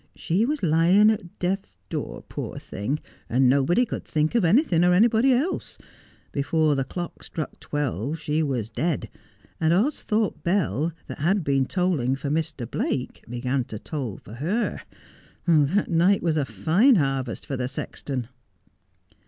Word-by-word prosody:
She 195 +8 +1
was 300 -3 -2
lying 175 +6 +5
at 180 -5 -5
death's 180 - -2
door, - - -4
poor - - -5
thing, 115 +10 -3 0.3
and 130 +2 +4
nobody 140 - +3
could 230 - -5
think 155 0 0
of 235 -4 +3
anything 180 - +4
or 180 0 +5
anybody 230 +5 +4
else. 280 +9 -1 0.5
Before 155 +2 +1
the 135 -1 0
clock 175 +6 -6
struck 155 - -6
twelve 145 - -2
she 155 0 -1
was 130 -8 -1
dead, 160 +6 -2 0.5
and 160 0 +2
Austhorpe 215 - +1
bell, 170 -4 +1
that - - -8
had 180 +5 +2
been 135 -2 +1
tolling 165 -9 +1
for 140 +1 -4
Mr. 155 -5 -2
Blake, 125 +3 -3
began 125 +2 -1
to 110 - -7
toll 125 -4 -5
for 105 - -13
her. 175 - -1 0.6
That 165 +4 +3
night, 175 +4 +3
was 165 -2 +1
a 145 -4 0 0.2
line 215 - +6
harvest 135 - -1
for 140 - -3
the 125 -1 -2
sexton.' 130 -1 -5
160 Hz, 155 wpm, -25 LUFS, 135-185 Hz, 0.6 s, line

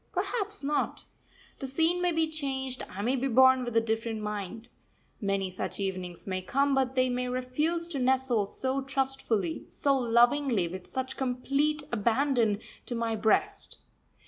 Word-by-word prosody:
Perhaps 415 - -2
not. 295 +1 -1 0.6
The 270 - -4
scene 325 +6 +2
may 355 0 +2
be 320 -1 +2
changed; 265 -4 -2
I 200 +2 -5
may 250 +4 +2
be 265 +1 0
born 260 +1 +6
with 240 -2 -1
a - - +6
different 225 -1 -2
mind. 210 +2 -5 0.5
Many 195 -2 0
such 185 - -4
evenings 185 -3 -4
may 185 -1 -2
come, 275 +9 +1
but 265 -1 +1
they 255 0 +3
may 250 0 -1
refuse 295 +7 0
to 290 -5 -3
nestle 255 -4 +2
so 265 +5 -1
trustfully, 265 -10 -1
so 280 -1 +2
lovingly, 240 -3 +3
with 185 +1 -7
such 260 0 -4
complete 275 +4 0
abandon, 235 -1 +2 0.3
to 240 - -2
my 230 -1 -1
breast. 220 0 +1
255 Hz, 155 wpm, -29 LUFS, 220-275 Hz, 0.6 s, born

